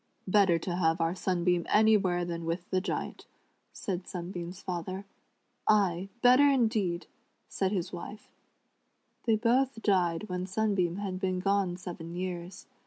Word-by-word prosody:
" - - -42
Better 190 -3 +4
have 175 -2 +1
our 165 +1 +1
Sunbeam 180 -2 0
anywhere 200 -5 +4
than 170 -1 -4
with 170 +2 -3
the 185 - +2
Giant," 195 - -4 0.4
sa'd 180 -2 -4
Sunbeam's 175 0 -6
father. 185 +2 -4 0.6
"A}, 195 -3 +3
better 255 +4 +7
indeed 220 -9 +1 0.3
!" - - -46
said 190 -1 +1
his 185 -4 -2
wife. 205 +4 -8 0.9
They 225 -2 +4
both 245 +2 +1
died 180 -1 +1
when 180 -1 -3
Sunbeam, 195 -4 0
had 195 -2 -4
been 185 -1 0
gone 195 -2 +1
seven 170 -2 -7
years. 180 0 -5
185 Hz, 140 wpm, -30 LUFS, 175-205 Hz, 0.9 s, better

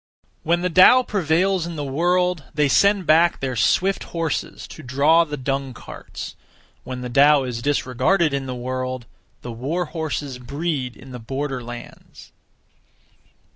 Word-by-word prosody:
1. - - -12
When 170 +1 +3
the 180 - +1
Tao 185 +9 +7
prevails 185 -2 0
in 170 - -6
the 150 - -4
world, 175 +3 0
they 150 -1 +3
send 200 +6 +3
back 165 +3 +4
their 130 -2 -3
swift 180 - +1
horses 165 -3 -4
to - - -10
(draw) 145 +5 +3
the 150 -2 -6
dung 135 -1 -3
carts. - - -9 0.5
When 125 -1 -6
the 125 - -4
Tao 140 +3 +5
is 120 -2 -4
disregarded 145 +5 +1
in 135 -1 -2
the 130 - -4
world, 130 0 -4 0.4
the 120 - -6
war 145 +10 -2
horses 150 -5 -4
breed 140 0 -3
in 130 - -13
the 125 - -7
border 135 +2 -4
lands. 120 0 -11
145 Hz, 155 wpm, -22 LUFS, 130-170 Hz, 0.5 s, Tao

